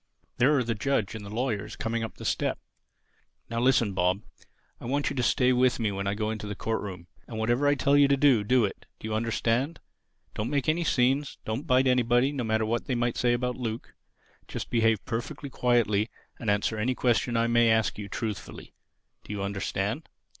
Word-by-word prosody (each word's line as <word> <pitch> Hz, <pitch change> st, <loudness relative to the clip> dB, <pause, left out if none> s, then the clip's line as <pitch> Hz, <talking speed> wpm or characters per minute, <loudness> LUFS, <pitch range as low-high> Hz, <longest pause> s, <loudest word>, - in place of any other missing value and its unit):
There 135 Hz, +4 st, +4 dB
are 130 Hz, -, +2 dB
the 115 Hz, 0 st, -1 dB
judge 110 Hz, -2 st, -1 dB
and 110 Hz, -2 st, -7 dB
the 100 Hz, -, -8 dB
lawyers 110 Hz, -2 st, -2 dB
coming 115 Hz, 0 st, -2 dB
up 115 Hz, -, -6 dB
the -, -, -9 dB
steps. -, -, 0 dB, 0.9 s
Now 115 Hz, -, -1 dB
listen, 120 Hz, -4 st, +3 dB
Bob: 95 Hz, +2 st, +1 dB, 0.6 s
I -, -, -10 dB
want 140 Hz, +4 st, 0 dB
you -, -, -5 dB
to 125 Hz, -, 0 dB
stay 125 Hz, +1 st, +3 dB
with 125 Hz, 0 st, +3 dB
me 110 Hz, -3 st, 0 dB
when 100 Hz, 0 st, -3 dB
I 100 Hz, -, 0 dB
go 110 Hz, 0 st, -1 dB
into 110 Hz, -1 st, -5 dB
the 105 Hz, -, -4 dB
court 110 Hz, +2 st, -2 dB
room. 90 Hz, -4 st, -7 dB, 0.2 s
And 115 Hz, -, -7 dB
whatever 120 Hz, +6 st, +1 dB
I 145 Hz, -, +4 dB
tell 140 Hz, 0 st, +2 dB
you 145 Hz, -1 st, +6 dB
to 140 Hz, 0 st, +3 dB
do, 135 Hz, -6 st, +4 dB
do 125 Hz, +2 st, +3 dB
it. 100 Hz, -, -7 dB
Do -, -, -6 dB
you 110 Hz, -, -3 dB
understand? 115 Hz, +6 st, 0 dB, 0.5 s
Don't 105 Hz, +3 st, -3 dB
make 140 Hz, -3 st, 0 dB
any 165 Hz, +2 st, +2 dB
scenes. 135 Hz, -1 st, +1 dB
Don't 120 Hz, +9 st, -3 dB
bite 130 Hz, 0 st, +4 dB
anybody, 125 Hz, +1 st, +3 dB
no 135 Hz, -4 st, -3 dB
matter 110 Hz, -1 st, +1 dB
what 115 Hz, +2 st, -1 dB
they 130 Hz, -, -1 dB
may 120 Hz, 0 st, 0 dB
say 120 Hz, -1 st, +1 dB
about 125 Hz, 0 st, -1 dB
Luke. 115 Hz, -2 st, -5 dB, 0.5 s
Just -, -, -6 dB
behave 115 Hz, -3 st, +2 dB
perfectly 135 Hz, +4 st, -4 dB
quietly 115 Hz, -4 st, +2 dB, 0.3 s
and 115 Hz, -, -2 dB
answer 105 Hz, +2 st, +1 dB
any 125 Hz, +4 st, 0 dB
question 120 Hz, -1 st, +1 dB
I 115 Hz, -, +3 dB
may 120 Hz, 0 st, +4 dB
ask 110 Hz, -1 st, +2 dB
you—truthfully. 105 Hz, +1 st, -6 dB, 0.5 s
Do -, -, -9 dB
you 100 Hz, -1 st, -3 dB
understand?" 100 Hz, -1 st, -2 dB
115 Hz, 205 wpm, -27 LUFS, 110-130 Hz, 0.9 s, you